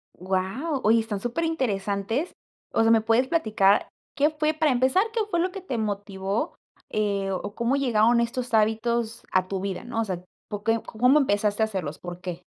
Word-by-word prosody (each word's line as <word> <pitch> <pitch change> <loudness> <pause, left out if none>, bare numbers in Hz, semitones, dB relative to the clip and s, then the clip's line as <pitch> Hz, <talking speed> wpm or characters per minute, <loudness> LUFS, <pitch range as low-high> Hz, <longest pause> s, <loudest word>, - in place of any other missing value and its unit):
Guau, 190 - -2
oye, 225 +2 +5
están 220 -3 -3
superinteresantes, 240 - -1 0.4
o - - +3
sea, 225 0 +4
¿me 225 -1 +5
puedes 230 +4 +2
platicar 215 - +2 0.3
qué 295 +1 +3
fue 305 0 0
para 310 -1 +2
empezar, 260 +9 +3
qué 460 - 0
fue 345 - 0
lo 360 +2 +1
que 390 - -7
te 275 -10 -4
motivó, 205 - -2 0.3
eh, 200 -2 0
o 190 +2 -4
cómo 235 +4 0
llegaron 235 -3 +3
estos 245 +1 -2
hábitos 225 +1 +1
a 185 -1 +2
tu 195 0 -3
vida, 195 0 -4
no? 235 -2 -2
O - - -1
sea, 180 -3 -4 0.3
po 205 -1 -5
que 225 +1 +1
¿cómo 250 +7 +3
empezaste 205 -4 +1
a 220 - +5
hacerlos? 185 -8 -4
¿Por 175 0 -7
qué? 180 -1 -6
225 Hz, 185 wpm, -25 LUFS, 200-260 Hz, 0.4 s, oye